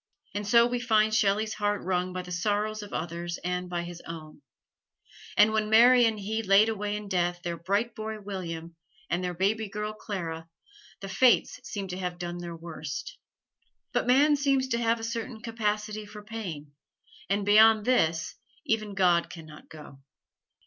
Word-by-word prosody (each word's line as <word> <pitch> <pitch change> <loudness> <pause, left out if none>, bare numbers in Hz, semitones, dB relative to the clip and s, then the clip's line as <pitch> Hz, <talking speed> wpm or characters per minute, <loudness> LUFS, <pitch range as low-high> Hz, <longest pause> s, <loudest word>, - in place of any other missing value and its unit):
And 205 0 -3
so 235 +2 +6
we 245 0 -1
find 220 -3 +2
Shelley's 215 +1 +2
heart 205 -1 -1
wrung 180 0 -1
by 180 0 -4
the 180 - -10
sorrows 210 +4 -1
of 205 - -9
others 170 +1 -4
and 180 0 -2
by 175 -1 -2
his 175 0 -8
own; 155 -3 -9 1.0
and 210 +1 +6
when 215 -1 0
Mary 240 +2 +7
and 220 -2 0
he 215 +3 -2
laid 205 +1 +5
away 210 -1 -2
in 210 0 -6
death 175 -2 -1
their 170 -2 -2
bright 200 +8 -1
boy 220 0 -5
William 170 -5 -6 0.4
and 175 +1 0
their 180 -1 -3
baby 205 +4 0
girl 210 +1 -4
Clara, 165 -7 -5 0.5
the 195 - -6
Fates 245 +6 +3
seemed 195 -3 -5
to 180 - -5
have 180 -1 -3
done 175 0 -5
their 170 -1 -6
worst. 155 -3 -7 0.7
But - - 0
man 285 +4 +5
seems 275 -2 +1
to 235 - 0
have 230 0 +1
a - - -8
certain 230 0 -4
capacity 215 -2 -3
for 210 0 -11
pain, 185 -10 -7 0.6
and 200 0 0
beyond 215 +1 +6
this 165 -10 +1 0.3
even 215 -6 -1
God 175 -3 +3
can 165 -2 -10
not 150 -1 -14
go. 150 -3 -12
205 Hz, 175 wpm, -28 LUFS, 175-220 Hz, 1.0 s, Mary